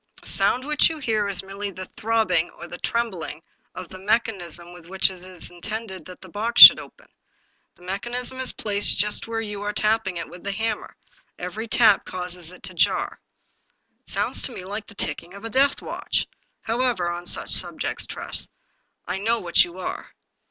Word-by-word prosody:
" - - -16
The - - -19
sound 255 +2 +1
which 300 +2 +4
you 320 - -5
hear 220 -7 0
is 195 -2 -1
merely 200 +1 -5
the 185 -1 -8
throbbing 210 -7 0
or - - -8
the 175 0 -9
trembling 185 -9 -3 0.3
of 185 -1 -7
the 185 - -10
mechanism 190 -5 -1
with 175 -2 -14
which 190 +1 +1
it 180 -1 -8
is 185 -2 -2
intended 190 0 -5
that 185 -1 -11
the 190 - -11
box 215 +6 -2
should - - +13
be - - -6
opened. - - -17 0.6
The 175 - -20
mechanism 240 +7 -3
is 260 - +3
placed 205 -1 +1
just 210 +2 0
where 225 0 -2
you 210 -2 -6
are 205 0 -3
tapping 215 -4 +1
it 165 - -5
with 180 - -13
the 200 - -2
hammer. 220 +1 -3 0.4
Every 210 +6 -5
tap 220 -3 +5
causes 180 -2 -5
it 180 - -15
to 185 -1 -3
jar." 170 - +1 0.4
" - - -47
It - - -16
sounds - - +2
to - - -1
me 185 -6 -7
like 205 +2 -6
the 205 - -14
ticking 175 -2 -4
of 200 - -10
a 225 - -5
deathwatch.. 275 +4 +1 0.4
However, 230 -7 0
on 175 0 -6
such - - -1
subjects. - - 0
Tress, - - -4 0.6
I 190 - -3
know 225 +4 +1
what 175 -5 +3
you 175 +1 -9
are." 185 - -6
200 Hz, 195 wpm, -23 LUFS, 180-225 Hz, 0.6 s, should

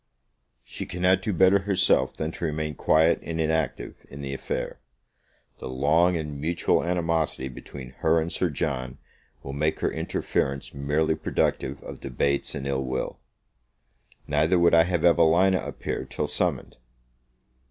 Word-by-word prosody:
She - - -7
cannot 90 +1 +2
do 105 - -1
better 95 +1 +5
herself 95 -1 +2
than 80 +1 -2
to 85 - -5
remain 75 -1 -2
quiet 80 +4 +3
and 80 0 -5
inactive 80 0 -1
in 70 +2 -9
the 70 0 -4
affair: 65 - -4 0.8
the - - -6
long 80 +7 +3
and 75 -3 -5
mutual 85 +3 +1
animosity 85 -6 -1
between 65 +1 -10
her 80 +1 +3
and 80 +1 -2
Sir 90 - 0
John 65 -4 -3 0.5
will 70 - -6
make 75 +2 -1
her - - +1
interference 70 0 -2
merely 75 +3 +1
productive 70 -3 -1
of - - -8
debates 70 0 -1
and 70 - -5
ill 70 -1 -1
will. 65 0 -3 1.1
Neither 80 +5 +2
would 85 0 +4
I 80 0 +6
have 90 -2 0
Evelina 85 +3 +4
appear - - -4
till - - -3
summoned. - - -2
80 Hz, 145 wpm, -26 LUFS, 70-85 Hz, 1.1 s, I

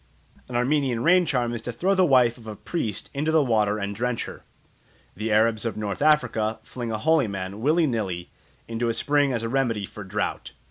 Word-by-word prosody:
An 125 - -6
Armenian 125 -1 +1
rain 180 +2 +4
charm 120 -2 0
is 115 - -4
to 125 - -4
throw 180 - +1
the 190 -1 +3
wife 125 -4 +4
of 110 - -14
a 110 - -6
priest 110 - -4
into 150 +3 0
the 160 -2 +4
water 105 -4 +1
and 100 0 -3
drench 125 +1 -1
her. - - -9 0.7
The 110 +3 -3
Arabs 110 0 +3
of 115 -2 -3
North 105 +1 -4
Africa 125 -8 +2
fling 120 0 -5
a 110 - -1
holy 150 +2 +2
man, 100 +1 -5
willy 160 +6 +3
nilly, 95 - -3 0.4
into 115 +1 -1
a 115 - -1
spring 145 -1 +2
as 115 -2 -1
a - - -1
remedy 115 -6 0
for 105 - -10
drought. 100 +2 -3
115 Hz, 205 wpm, -25 LUFS, 110-140 Hz, 0.7 s, rain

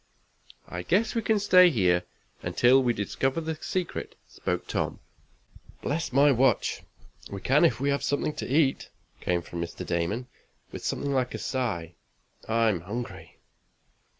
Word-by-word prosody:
"I 85 - -5
guess 205 - +1
we 230 - 0
can 220 0 +2
stay 180 -3 +6
here 90 - +2 0.4
until 130 +2 +4
we 125 -2 +2
discover 130 - -1
the 160 0 -3
secret," 180 -2 -3
spoke 90 0 -3
Tom. - - -2 0.8
"Bless 155 0 -2
my 140 +3 +5
watch! 130 +1 +2 0.5
We 100 - -6
can 140 - +3
if 125 -9 +3
we 140 +1 +1
have 140 - 0
something 145 +1 0
to - - -4
eat," 140 -2 +2 0.3
came 85 -1 -1
from 85 0 -6
Mr. 85 - -5
Damon, 85 +8 -1 0.5
with - - -8
something 140 0 -1
like 130 -2 0
a - - -2
sigh. 90 -11 -3 0.6
"I'm 110 -5 +2
hungry!" 115 +7 -7
130 Hz, 150 wpm, -27 LUFS, 95-150 Hz, 0.8 s, stay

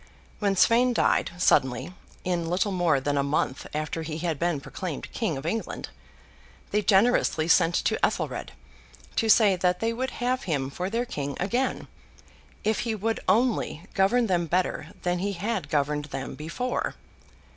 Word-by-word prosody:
When 200 -2 +1
Sweyn 240 +6 +4
died - - +2
suddenly, 130 -2 +2 0.3
in 175 -2 -1
little 185 +4 +1
more 175 -6 +2
than 145 +1 0
a - - +2
month 140 -1 -1
after 155 +2 -3
he 155 -1 -4
had 165 -3 -2
been 170 -3 0
proclaimed 160 +3 -6
King 185 - -1
of 135 - -7
England, 220 +7 -3 0.8
they 210 - +2
generously 195 -6 +3
sent 170 0 +4
to - - 0
Ethelred, - - -1 0.6
to 225 - +1
say 210 -3 +6
that 180 0 +1
they 225 0 0
would 260 +3 -2
have 250 +1 -1
him 140 -6 -1
for 180 +6 -3
their 230 +3 -1
King 145 - -4
again, 240 +8 -1 0.8
'if 220 0 +1
he 230 -2 -1
would 220 +2 -1
only 225 -8 +1
govern 215 +6 +3
them 175 -5 +1
better 175 -2 0 0.2
than 180 0 0
he 200 +2 -1
had 195 -4 -3
governed 145 0 0
them 135 -2 -5
before. 170 +12 -3
180 Hz, 160 wpm, -26 LUFS, 155-220 Hz, 0.8 s, say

